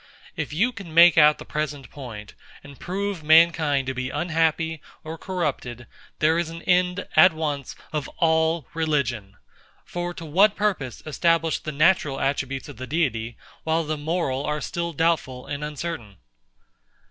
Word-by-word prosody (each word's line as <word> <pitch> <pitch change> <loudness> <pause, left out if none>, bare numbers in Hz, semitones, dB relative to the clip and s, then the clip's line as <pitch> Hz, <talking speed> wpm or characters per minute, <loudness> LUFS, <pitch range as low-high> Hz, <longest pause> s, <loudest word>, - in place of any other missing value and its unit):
If - - -4
you 205 +12 +1
can 195 -9 -10
make 170 0 +8
out 150 -1 +6
the - - -10
present 150 -2 -4
point, 110 -7 -9 0.3
and 140 -2 -13
prove 195 0 -3
mankind 155 -3 +4
to 130 - -2
be 130 0 -3
unhappy 160 -1 0 0.2
or 160 +1 -6
corrupted, 150 - -4 0.3
there 160 +2 +3
is 170 -1 -2
an 165 0 -9
end 180 +1 +1
at 185 -2 +7
once 150 -4 -3 0.2
of 150 -3 -2
all 160 -2 +2
religion. 130 -11 -1 0.5
For 175 0 -4
to 165 - -8
what 195 +7 +4
purpose 175 - -2
establish 165 +1 +1
the 155 - -5
natural 155 -2 +2
attributes 135 -1 -2
of - - -10
the 130 +1 -7
Deity, 120 -7 -1 0.3
while 160 +1 +1
the 155 0 -2
moral 150 -3 -2
are 150 0 -2
still 170 +2 -3
doubtful 160 -5 0
and 145 +1 -5
uncertain? 150 - -5
155 Hz, 155 wpm, -24 LUFS, 140-170 Hz, 0.5 s, make